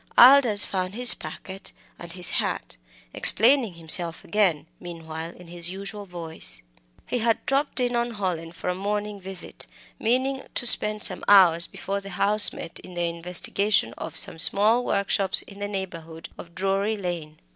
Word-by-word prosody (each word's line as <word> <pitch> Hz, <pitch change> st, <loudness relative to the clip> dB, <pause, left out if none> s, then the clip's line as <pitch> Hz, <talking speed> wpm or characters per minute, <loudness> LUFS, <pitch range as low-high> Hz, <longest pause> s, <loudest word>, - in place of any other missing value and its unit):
Aldous 245 Hz, -5 st, +7 dB
found 185 Hz, 0 st, -5 dB
his 245 Hz, +1 st, +8 dB
packet 190 Hz, +1 st, -10 dB, 0.3 s
and 170 Hz, -1 st, -10 dB
his 180 Hz, -1 st, -1 dB
hat, -, -, -4 dB, 0.4 s
explaining 230 Hz, -3 st, +4 dB
himself 170 Hz, 0 st, +1 dB
again, 190 Hz, -9 st, -1 dB
meanwhile, 165 Hz, -1 st, -9 dB
in 180 Hz, 0 st, -16 dB
his 170 Hz, 0 st, 0 dB
usual 200 Hz, +2 st, -7 dB
voice. 160 Hz, -, -7 dB, 0.4 s
He 245 Hz, -, -4 dB
had 230 Hz, 0 st, -1 dB
dropped 275 Hz, 0 st, -1 dB
in 245 Hz, -1 st, -2 dB
on 235 Hz, -1 st, -3 dB
Hallin 175 Hz, -5 st, -5 dB
for 170 Hz, -, -10 dB
a 180 Hz, -, -1 dB
morning 205 Hz, +1 st, -5 dB
visit, 190 Hz, -1 st, -9 dB, 0.3 s
meaning 260 Hz, +4 st, -1 dB
to -, -, +2 dB
spend 210 Hz, -2 st, +5 dB
some 185 Hz, -, -4 dB
hours 175 Hz, -4 st, +4 dB
before 200 Hz, +1 st, -6 dB
the 195 Hz, -, -11 dB
House 205 Hz, +3 st, +5 dB
met 165 Hz, -, -9 dB
in 185 Hz, -, -14 dB
the 175 Hz, 0 st, -2 dB
investigation 175 Hz, -, -2 dB
of -, -, -7 dB
some 160 Hz, -, +3 dB
small 215 Hz, +7 st, +3 dB
workshops 195 Hz, -3 st, +2 dB
in 200 Hz, 0 st, -15 dB
the 205 Hz, -, -5 dB
neighbourhood 165 Hz, -5 st, -8 dB
of 170 Hz, 0 st, -14 dB
Drury 195 Hz, +3 st, -2 dB
Lane. 170 Hz, -5 st, -7 dB
195 Hz, 160 wpm, -23 LUFS, 170-210 Hz, 0.4 s, his